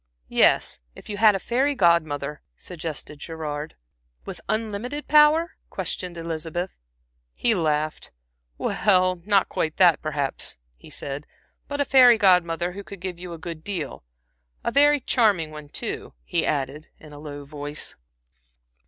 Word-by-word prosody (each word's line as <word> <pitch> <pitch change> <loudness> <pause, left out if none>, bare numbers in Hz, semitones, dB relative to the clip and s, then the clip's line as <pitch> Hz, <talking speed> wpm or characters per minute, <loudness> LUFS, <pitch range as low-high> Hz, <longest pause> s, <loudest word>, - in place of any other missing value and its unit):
"Yes, - - +4 0.2
if - - -12
you 205 - -4
had 215 -1 +6
a - - -1
fairy 265 +8 +1
Godmother," 155 - +2 0.2
suggested 155 -4 -7
Gerard. 155 -1 -5 0.5
"With - - -7
unlimited 225 +6 -3
power?" 305 +3 +5
questioned 180 -2 -4
Elizabeth. 165 +2 -4 0.6
He 235 - +2
laughed. 155 -4 -1 0.5
"Well, 185 -3 +2
not 200 -2 +3
quite 155 -1 -2
that, 175 -4 +5
perhaps," 145 - -3 0.2
he - - -15
said, 140 +1 -6 0.4
"but 285 0 -4
a 285 - +3
fairy 250 -4 +7
Godmother 180 -3 +3
who 200 +2 -8
could 200 -1 -10
give 180 -1 -5
you 180 -1 -7
a - - -7
good 160 -1 -7
deal. 175 - -5 0.6
A - - 0
very 290 +2 +5
charming 205 -11 +2
one, 150 -1 -10
too," - - -4
he - - -1
added, 145 +1 -2
in 155 -1 -14
a 145 - -10
low 145 -1 -8
voice. 145 +1 -5
175 Hz, 145 wpm, -24 LUFS, 150-210 Hz, 0.6 s, fairy